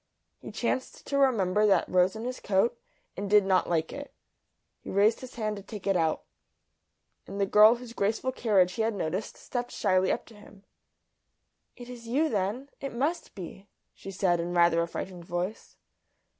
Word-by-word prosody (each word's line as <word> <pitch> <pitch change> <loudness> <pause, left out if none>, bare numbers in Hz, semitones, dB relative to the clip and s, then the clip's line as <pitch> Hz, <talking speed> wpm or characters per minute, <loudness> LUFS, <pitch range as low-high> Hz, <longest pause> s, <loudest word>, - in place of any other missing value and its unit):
He - - -9
chanced 260 - -3
to 280 - -1
remember 210 -6 +3
that 195 - +3
rose 185 +2 +2
in 220 - -6
his 255 0 -4
coat, 205 +5 +1 0.4
and 200 +1 -4
did 210 -1 +5
not 190 -1 +2
like 165 -2 0
it. 285 0 -8 0.7
He - - -10
raised 205 +3 +3
his 255 - -10
hand 215 -2 -2
to - - -7
take 205 0 -9
it 195 -1 +2
out. 160 -3 +1 1.0
And 200 +1 -6
the 200 - +3
girl 210 +3 +7
whose 240 -1 -10
graceful 225 +5 0
carriage 200 -8 +2
he 225 - -2
had 220 -1 0
noticed 185 +3 -3
stepped 245 -1 -4
shyly 185 -2 +1
up - - -2
to 230 - -16
him. 205 -1 -16 1.1
"It 245 - -11
is 240 -2 -10
you 295 +7 +1
then? 215 +6 -2
It 275 - -5
must 310 +5 -2
be," 195 +1 -9 0.3
she - - -10
said, 180 -2 +1
in 175 +1 -3
rather 170 -1 +4
a 170 - -1
frightened 175 0 -7
voice. 175 +5 -4
205 Hz, 185 wpm, -28 LUFS, 185-235 Hz, 1.1 s, girl